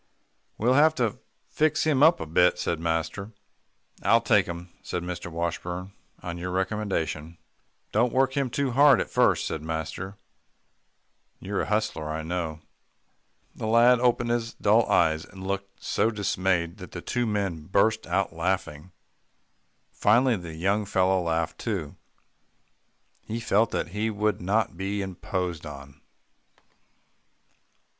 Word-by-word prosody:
"We'll 120 +4 +2
have 155 +3 +5
to 120 -6 -1 0.3
fix 155 0 +1
him 150 -4 +2
up 160 +3 +6
a - - -4
bit," 90 +3 +3
said 85 -2 -2
master. 85 +6 -2 0.7
"I'll - - +5
take - - +3
him," 85 +1 -7
said 90 - -4
Mr. 90 -1 -5
Washburn, 90 +3 -4 0.3
"on 85 -1 -5
your 90 +1 -4
recommendation." 90 -4 -2 0.5
"Don't 120 +3 +2
work 130 0 +2
him 140 -2 0
too 140 +2 -1
hard 140 +3 +6
at - - -3
first," - - +3
said 80 - -3
master. 80 +5 -5 1.2
"You're 100 +1 -2
a - - -3
hustler, 105 -8 -1
I 80 0 -3
know." 80 -2 -3 0.9
The 110 - -5
lad 120 +2 +5
opened 120 -1 +2
his 120 -1 -2
dull - - +3
eyes, 80 0 +3
and 95 0 -11
looked 100 0 -5
so 110 - +1
dismayed, 95 -4 0
that 90 -2 -11
the 85 - -6
two 120 +4 -1
men 100 -7 -2
burst 110 +3 +2
out 95 -3 0
laughing. 85 -1 -2 1.0
Finally 120 +3 +3
the 85 -3 -8
young 100 +6 +1
fellow 95 -1 +2
laughed 80 -1 -1
too. 95 -11 -3 1.3
He 115 +2 -3
felt 115 -1 +2
that - - -2
he 105 +4 -1
would 105 -2 -1
not 100 +2 0
be 100 +2 -2
imposed 90 -3 -4
on. 70 -1 -11
95 Hz, 140 wpm, -26 LUFS, 85-110 Hz, 1.3 s, up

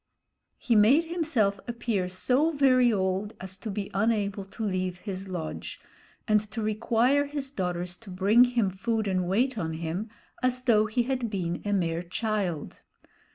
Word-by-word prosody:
He 235 - +1
made 235 +10 +6
himself 300 - 0
appear 235 -6 -1
so 255 - +2
very 260 -5 +4
old 195 +1 -1
as 190 0 -6
to 215 +3 -6
be 200 0 -4
unable 200 -1 0
to 220 +3 -7
leave 185 -2 -1
his 190 0 -6
lodge 170 -4 -5 0.5
and 215 -1 +4
to 220 +1 -4
require 230 +6 +2
his 280 -2 -4
daughters 180 -6 -3
to 220 -1 -14
bring 200 +7 +5
him 235 -6 +1
food 220 +2 -1
and 185 -2 0
wait 235 +5 +1
on 160 -3 -2
him, 170 +7 -4 0.3
as 255 0 0
though 215 -4 +4
he 235 +3 +1
had 250 -2 -2
been 175 -4 -3
a 205 - -1
mere 170 -4 0
child. 185 -3 -3
210 Hz, 160 wpm, -27 LUFS, 185-240 Hz, 0.5 s, made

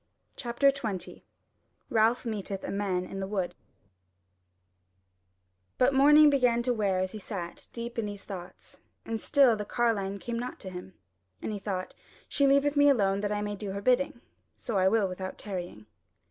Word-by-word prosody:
CHAPTER 250 +3 +2
20 220 -9 -5 0.7
Ralph 225 +2 +3
Meeteth 200 -3 -4
a - - -4
Man 195 -3 -1
in 195 - -7
the 190 - -3
Wood 190 -3 -2 2.2
But 255 +2 +4
the 270 - 0
morning 295 +1 +8
began 245 -4 +3
to 250 0 +1
wear 200 -4 0
as 185 0 -1
he 215 - -7
sat 185 -4 -7
deep 235 0 -5
in 215 - -1
these 205 -1 -7
thoughts 180 -3 -10 0.3
and 225 -1 -3
still 275 -5 +5
the 210 - -4
Carline 205 -3 0
came 230 +5 -4
not 245 +1 -5
to 190 - -7
him; 180 +1 -9 0.4
and - - -4
he 205 - -4
thought: 190 -2 -4 0.3
"She 280 -1 +2
leaveth 280 +1 +3
me 285 0 +6
alone 200 -7 +3
that 205 0 -1
I 210 0 -1
may 205 0 -3
do 200 -1 -5
her 200 - -4
bidding: 255 +3 +1 0.4
so 235 - -5 0.2
will 220 +1 +2
I - - +2
without 185 0 -6
tarrying." 175 - -6
210 Hz, 175 wpm, -29 LUFS, 195-245 Hz, 2.2 s, morning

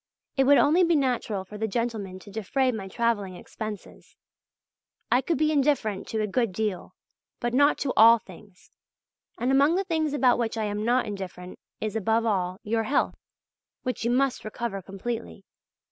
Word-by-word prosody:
It 270 -1 +3
would 285 +1 +6
only 325 +6 +4
be 340 -1 +3
natural 245 -8 0
for 210 +2 -10
the 220 - 0
gentlemen 215 -4 -3
to 205 - -13
defray 255 +6 0
my 210 -5 -5
travelling 205 -3 -1
expenses. 215 +2 -9 1.0
I 250 - +4
could 325 +4 -1
be 305 +2 +2
indifferent 270 -9 +1
to 220 - -2
a - - +1
good 225 +1 0
deal, 210 -2 -3 0.4
but 240 0 -2
not 285 +3 +4
to 265 - 0
all 230 +2 +8
things! 195 -2 -16 0.7
And 245 +3 0
among 280 +5 +4
the 385 - +1
things 315 -5 -1
about 255 -4 +3
which 230 -1 -1
I 220 - -1
am 210 0 -2
not 245 +3 +2
indifferent 190 -3 -7 0.2
is, 215 -1 -3
above 225 +1 +1
all, 185 -4 0
your 225 +1 0
health, 280 - 0 0.6
which 255 -2 -3
you 235 - +1
must 260 +1 +1
recover 215 -2 -4
completely. 195 +2 -6
230 Hz, 175 wpm, -26 LUFS, 205-260 Hz, 1.0 s, all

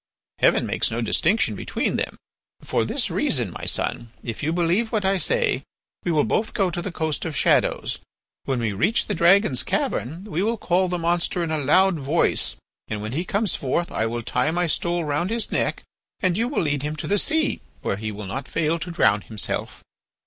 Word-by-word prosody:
Heaven - - +4
makes - - 0
no 115 - -3
distinction 155 - +2
between - - -2
them. - - -2 0.4
For - - 0
this - - -1
reason, - - 0
my - - -7
son, 120 - -2
if 115 -3 -5
you 155 - 0
believe 175 +7 +1
what 210 -3 0
I 195 0 +3
say, 485 - +1 0.4
we 175 - 0
will 155 -2 +3
both 215 - 0
go 195 -4 +2
to 175 - -3
the 190 - -4
Coast 160 -2 -2
of 160 -4 -3
Shadows; - - +2 0.5
when 130 -2 0
we 110 -3 -1
reach 115 - +2
the 210 - -2
dragon's 180 - +4
cavern 155 - -2
we 190 -5 -2
will 225 +3 +1
call 185 -1 +2
the 180 0 -1
monster 170 +1 0
in 165 - -2
a 155 - 0
loud 170 +5 +4
voice, 145 +5 +2 0.3
and 105 -1 -4
when 110 - -4
he 155 +7 -1
comes 200 +1 0
forth 155 +6 -1
I 110 - 0
will 120 +1 -3
tie 125 +5 +1
my 175 +2 +1
stole 170 +1 0
round 150 +5 0
his 230 0 -1
neck - - 0 0.4
and 185 -3 +1
you 230 +4 +1
will 265 -7 0
lead 145 -3 0
him 150 +2 -3
to - - -5
the 205 +1 +2
sea, 315 +4 +1 0.2
where 95 - -1
he 110 +1 -4
will 105 0 -7
not 130 +8 -4
fail 165 +1 0
to 165 - -5
drown 105 -11 +3
himself." 110 -2 -3
170 Hz, 205 wpm, -24 LUFS, 135-190 Hz, 0.5 s, Heaven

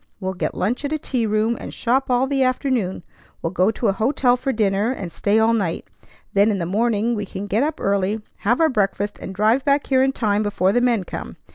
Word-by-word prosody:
We'll 190 -1 -3
get 185 - -3
lunch 230 +9 -1
at 285 - -2
a - - +1
tea 250 -6 -2
room, 215 +2 +1
and - - -7
shop 260 +3 0
all 250 +1 +3
the 270 0 0
afternoon. 255 - 0 0.4
We'll 165 - -1
go 185 +2 +2
to 225 +2 -3
a 200 - +3
hotel 245 +4 +2
for 260 +2 -2
dinner, 210 0 +1
and 190 -9 -5
stay 205 +6 +1
all 225 +1 +4
night. 185 -7 -2 0.5
Then 200 +2 +4
in 205 - 0
the 170 - -2
morning 220 +4 +1
we 205 -3 -3
can 195 +2 -6
get 205 +3 0
up 305 +2 -1
early, 200 +2 0 0.2
have 235 +5 +1
our 325 -1 +4
breakfast, 205 -3 -1
and - - -7
drive 220 +6 +2
back 280 0 +2
here 260 -1 +3
in 265 0 +3
time 210 -5 0
before 200 -3 +1
the 245 - +2
men 240 -5 +2
come. - - -7
220 Hz, 235 wpm, -21 LUFS, 200-255 Hz, 0.5 s, all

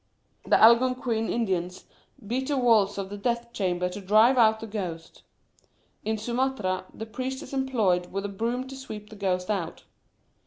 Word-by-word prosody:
The - - +4
Algonquin 235 -1 +4
Indians 185 -6 -2 0.4
beat 255 +5 -2
the 285 - 0
walls 220 -6 +3
of 195 -1 -4
the 205 - -6
death 235 +1 -2
chamber 180 -2 0
to 190 +3 -7
drive 215 +6 +5
out 220 -3 +4
the 225 - -6
ghost; 180 -7 -6 0.8
in 220 +1 -1
Sumatra, 235 -5 -1
a 220 - -4
priest 260 +4 -5
is - - -11
employed 220 -10 +1
with 195 +1 -3
a - - -3
broom 235 +6 -2
to 270 - -8
sweep 215 -5 -9
the - - -9
ghost 185 -1 -1
out. 185 -6 -3
220 Hz, 165 wpm, -26 LUFS, 195-245 Hz, 0.8 s, drive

